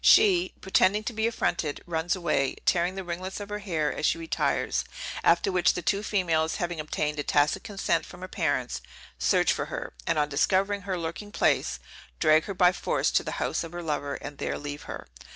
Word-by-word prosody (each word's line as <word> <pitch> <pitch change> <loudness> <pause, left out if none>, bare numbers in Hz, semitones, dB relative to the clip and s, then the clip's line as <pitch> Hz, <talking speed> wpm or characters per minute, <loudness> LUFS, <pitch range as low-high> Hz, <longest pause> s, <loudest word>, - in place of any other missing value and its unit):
She, 185 -3 +5
pretending 190 +2 +3
to 235 - -3
be 220 +1 +1
affronted, 170 -9 -1
runs 165 +1 0
away, 155 -7 0
tearing 175 +1 +2
the 190 - -4
ringlets 185 +3 -5
of 205 0 -7
her 210 0 -3
hair 165 -7 -1
as - - -6
she 165 - +3
retires; 165 -1 0 0.4
after 195 - +4
which 180 -1 +3
the 180 - -3
two 200 +4 +1
females, 165 -7 +1
having 175 -2 -3
obtained 150 0 -2
a - - 0
tacit 145 +1 +2
consent 205 -3 0
from - - -12
her 185 - -5
parents, 145 - -1 0.4
search - - +3
for - - -2
her, - - -5
and - - +2
on 150 -1 +2
discovering 195 +7 +1
her 185 - 0
lurking 170 +5 -5
place, - - +1 0.4
drag 155 0 +5
her 200 - -5
by 180 0 +5
force 180 - 0
to - - +2
the - - -4
house - - -1
of 165 0 -8
her 175 0 -5
lover, 145 -3 -2
and 145 -1 -8
there - - -2
leave 145 0 -6
her. - - -6
175 Hz, 205 wpm, -27 LUFS, 155-190 Hz, 0.4 s, She